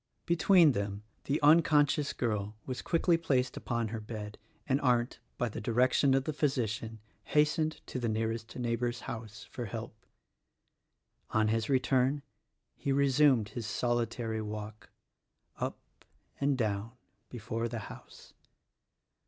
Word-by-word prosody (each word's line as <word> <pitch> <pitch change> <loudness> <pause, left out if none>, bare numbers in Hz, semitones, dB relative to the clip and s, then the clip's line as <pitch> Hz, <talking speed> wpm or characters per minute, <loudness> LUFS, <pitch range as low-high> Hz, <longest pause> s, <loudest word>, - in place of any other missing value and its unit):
Between 170 -1 +5
them 100 -2 -3 0.2
the 145 - 0
unconscious 150 -2 +4
girl 105 -3 -2
was 125 -2 -4
quickly 170 0 +2
placed 130 -6 0
upon 115 -2 -2
her 110 0 -4
bed, 105 -1 -7 0.3
and 140 0 +2
Arndt, 120 -2 +1 0.2
by 120 - 0
the 110 - -6
direction 130 +3 +3
of 135 - +2
the 155 - -3
physician, 115 -6 -1 0.3
hastened 155 +1 +1
to 130 - -5
the 120 -2 -1
nearest 110 0 -2
neighbor's 120 0 -1
house 110 -1 -7
for 120 - -5
help. 115 +1 -6 1.4
On 110 -1 +2
his 110 0 0
return 130 +1 +2 0.5
he 140 - -2
resumed 135 -5 +4
his 110 0 -5
solitary 115 -1 -1
walk; 105 0 -7 0.7
up - - -3 0.6
and 140 -1 +2
down 110 -1 -1 0.4
before 115 0 -3
the 115 0 -5
house. - - -13
120 Hz, 130 wpm, -31 LUFS, 110-140 Hz, 1.4 s, Between